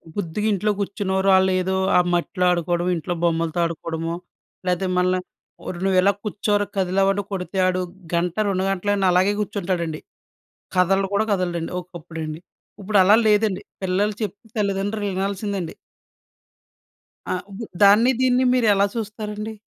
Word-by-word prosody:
బుద్దిగా 205 Hz, +2 st, -2 dB
ఇంట్లో 210 Hz, +2 st, +1 dB
కూర్చున్న 200 Hz, -1 st, -2 dB
ఓరి 195 Hz, +1 st, +2 dB
ఆల్లేదో 190 Hz, 0 st, +2 dB, 0.2 s
ఆ -, -, +7 dB
మట్టిలో 180 Hz, +1 st, 0 dB
ఆడుకోవడమో, 175 Hz, +1 st, 0 dB
ఇంట్లో 175 Hz, +2 st, -3 dB
బొమ్మలతో 165 Hz, 0 st, 0 dB
ఆడుకోవడమో 165 Hz, 0 st, -3 dB, 0.5 s
లేతే 180 Hz, +1 st, +1 dB
మళ్ళ 180 Hz, 0 st, +3 dB, 0.7 s
నువ్వు 190 Hz, -1 st, +2 dB
ఎలా 200 Hz, +2 st, +4 dB
కూర్చోరా 205 Hz, 0 st, 0 dB
కదిలేవంటే 195 Hz, +2 st, +2 dB
కొడితే, 190 Hz, 0 st, -4 dB
ఆడు 185 Hz, 0 st, 0 dB, 0.3 s
గంట, 170 Hz, 0 st, 0 dB
2 190 Hz, -1 st, 0 dB
గంటలైనా 195 Hz, 0 st, +1 dB
అలాగే 185 Hz, +3 st, +3 dB
కూర్చుంటాడండి. 180 Hz, -6 st, -2 dB, 0.8 s
కదలడు 195 Hz, +2 st, +3 dB
కూడా 215 Hz, +2 st, +3 dB
కదలడండి. 175 Hz, -3 st, -1 dB
ఒకప్పుడండి. 165 Hz, -2 st, -7 dB, 0.4 s
ఇప్పుడలా 200 Hz, 0 st, +5 dB
లేదండి. 210 Hz, -2 st, +2 dB, 0.2 s
పిల్లలు 200 Hz, +3 st, +1 dB
చెప్తే 205 Hz, +2 st, -5 dB
తల్లిదండ్రులు 205 Hz, +1 st, -1 dB
వినాల్సిందండి. 195 Hz, -2 st, -3 dB, 1.6 s
ఆ! -, -, 0 dB, 0.2 s
ఉప్పుడు 220 Hz, +3 st, -7 dB
దాన్ని 215 Hz, +6 st, +6 dB
దీన్ని 255 Hz, 0 st, +3 dB
మీరెలా 205 Hz, -5 st, +3 dB
చూస్తారండి? 215 Hz, 0 st, -5 dB
190 Hz, 120 wpm, -22 LUFS, 180-205 Hz, 1.6 s, ఆ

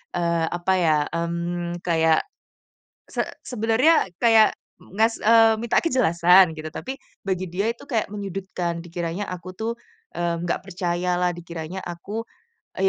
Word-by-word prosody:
eee, 170 Hz, -1 st, +1 dB
apa 175 Hz, +2 st, 0 dB
ya, 155 Hz, -3 st, +3 dB
mmm, 170 Hz, +1 st, -3 dB
kayak, 160 Hz, -2 st, +3 dB, 0.9 s
se -, -, -1 dB, 0.2 s
sebenarnya 245 Hz, +4 st, +3 dB
kayak 225 Hz, -2 st, +6 dB, 0.3 s
ngas 225 Hz, +4 st, 0 dB
eee, 225 Hz, 0 st, +6 dB
minta 235 Hz, -, +2 dB
kejelasan 180 Hz, -, +4 dB
gitu 155 Hz, -, -6 dB
tapi 265 Hz, +1 st, -5 dB, 0.3 s
bagi 185 Hz, -1 st, -1 dB
dia 200 Hz, +6 st, 0 dB
itu 235 Hz, -, -8 dB
kayak 225 Hz, -7 st, -1 dB
menyudutkan, 190 Hz, -4 st, -4 dB
dikiranya 175 Hz, +3 st, -4 dB
aku 180 Hz, 0 st, -7 dB
tuh, 225 Hz, +1 st, -2 dB, 0.4 s
eee, 170 Hz, -1 st, -1 dB
nggak 175 Hz, -, -1 dB
percaya 180 Hz, -1 st, -1 dB
lah, 180 Hz, 0 st, +2 dB
dikiranya 170 Hz, +1 st, -7 dB
aku, 200 Hz, +6 st, -5 dB, 0.5 s
e 190 Hz, -, +1 dB
180 Hz, 135 wpm, -24 LUFS, 170-220 Hz, 0.9 s, kayak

